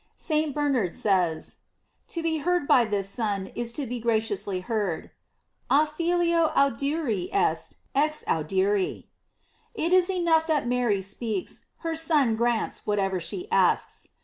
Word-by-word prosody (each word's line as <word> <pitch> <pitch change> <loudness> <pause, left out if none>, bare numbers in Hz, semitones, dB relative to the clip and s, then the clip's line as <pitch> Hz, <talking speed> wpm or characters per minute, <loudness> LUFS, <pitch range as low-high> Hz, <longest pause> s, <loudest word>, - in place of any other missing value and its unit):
St. 310 -2 0
Bernard 275 - 0
says: 180 -6 0 0.5
To 335 - -5
be 320 -1 0
heard 350 -1 0
by 245 -3 +5
this 205 -2 -1
Son 200 -3 -2
is 235 -1 -3
to 285 +2 -2
be 245 0 -4
graciously 220 -4 -1
heard: 195 -4 -2 0.6
"A 295 +2 +5
Filio 335 +1 +1
audiri 275 - +1
est 405 +2 0 0.2
exaudiri." 195 - 0 0.7
It 345 -4 0
is 370 0 +5
enough 335 -4 +2
that 300 -6 +1
Mary 240 -6 +1
speaks, 205 0 -4 0.2
her 330 0 -1
Son 300 -8 +2
grants 235 0 -1
whatever 195 -3 0
she 360 - -4
asks. - - +1
245 Hz, 130 wpm, -26 LUFS, 205-320 Hz, 0.7 s, by